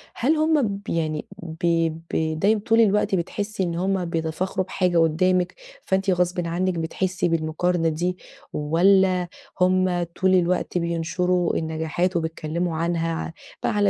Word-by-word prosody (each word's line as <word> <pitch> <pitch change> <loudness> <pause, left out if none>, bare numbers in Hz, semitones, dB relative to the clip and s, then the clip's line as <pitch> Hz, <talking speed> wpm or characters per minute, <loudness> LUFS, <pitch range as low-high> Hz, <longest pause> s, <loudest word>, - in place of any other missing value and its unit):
هل 295 +7 +2
هم 310 -1 +3 0.2
ب 200 - -11
يعني 155 -2 -1 0.2
ب 165 +1 -5 0.5
ب 160 0 0
دايمًا 210 +1 +3
طول 225 +1 +4
الوقت 210 -2 +3
بتحسي 205 +3 -2
إن 170 -1 -2
هما 185 +1 0
بيتفاخروا 170 +3 -2
بحاجة 180 -2 0
قدامِك، 180 +3 +2 0.3
فأنتِ 190 +1 0
غصبًا 180 -1 +1
عنِك 185 +2 0
بتحسي 175 +2 -1
بالمقارنة 165 +1 0
دي؟ 175 +3 -2 0.4
والّا 180 +4 +3 0.3
هم 185 -1 +3
طول 185 +3 0
الوقت 180 0 +1
بينشروا 170 +1 0
النجاحات 160 +3 -1
وبيتكلموا 160 +1 -2
عنها 165 0 0
ع - - -4 0.3
ب - - +1
على 205 -2 +2
180 Hz, 140 wpm, -23 LUFS, 165-190 Hz, 0.5 s, طول